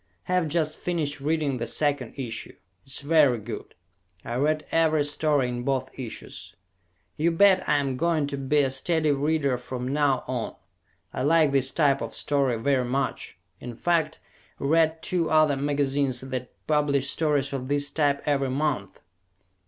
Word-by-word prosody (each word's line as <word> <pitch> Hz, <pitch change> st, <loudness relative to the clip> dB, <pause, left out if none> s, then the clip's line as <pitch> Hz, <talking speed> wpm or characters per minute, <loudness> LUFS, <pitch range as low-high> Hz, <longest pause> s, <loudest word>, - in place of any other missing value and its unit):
Have 180 Hz, -2 st, 0 dB
just 155 Hz, 0 st, -1 dB
finished 155 Hz, -5 st, -2 dB
reading 145 Hz, -2 st, 0 dB
the 120 Hz, -1 st, -3 dB
second 145 Hz, -5 st, -1 dB
issue. 120 Hz, -4 st, -5 dB, 0.3 s
It -, -, -13 dB
is -, -, -4 dB
very 145 Hz, -4 st, +4 dB
good. 110 Hz, 0 st, -8 dB, 0.5 s
I 120 Hz, -, -4 dB
read 150 Hz, +5 st, 0 dB
every 155 Hz, -2 st, +3 dB
story 145 Hz, -2 st, +1 dB
in 120 Hz, 0 st, -3 dB
both 135 Hz, 0 st, -1 dB
issues. 120 Hz, -4 st, -8 dB, 0.6 s
You 160 Hz, +3 st, +2 dB
bet 190 Hz, +2 st, +4 dB
I 150 Hz, -, +4 dB
am 135 Hz, -2 st, -1 dB
going 160 Hz, 0 st, +1 dB
to 140 Hz, 0 st, -4 dB
be 145 Hz, +2 st, +2 dB
a 135 Hz, -2 st, 0 dB
steady 155 Hz, +3 st, +1 dB
reader 140 Hz, -2 st, 0 dB
from 125 Hz, 0 st, -5 dB
now 140 Hz, -1 st, +1 dB
on. 125 Hz, -3 st, -3 dB, 0.6 s
I -, -, -3 dB
like 155 Hz, +1 st, +4 dB
this 135 Hz, -1 st, +2 dB
type 140 Hz, -2 st, +2 dB
of -, -, -5 dB
story 135 Hz, -4 st, +1 dB
very 130 Hz, +2 st, +1 dB
much 135 Hz, +2 st, -3 dB, 0.2 s
in 120 Hz, -1 st, -8 dB
fact, 160 Hz, +2 st, 0 dB, 0.4 s
read 160 Hz, +2 st, +1 dB
two 170 Hz, -3 st, 0 dB
other 155 Hz, -2 st, +4 dB
magazines 140 Hz, -2 st, 0 dB
that 130 Hz, -1 st, -5 dB
publish 140 Hz, -3 st, +1 dB
stories 145 Hz, -3 st, 0 dB
of 130 Hz, -2 st, -4 dB
this 145 Hz, 0 st, 0 dB
type 145 Hz, -2 st, +1 dB
every 140 Hz, -2 st, +1 dB
month. 130 Hz, -8 st, -2 dB
140 Hz, 160 wpm, -26 LUFS, 130-155 Hz, 0.6 s, very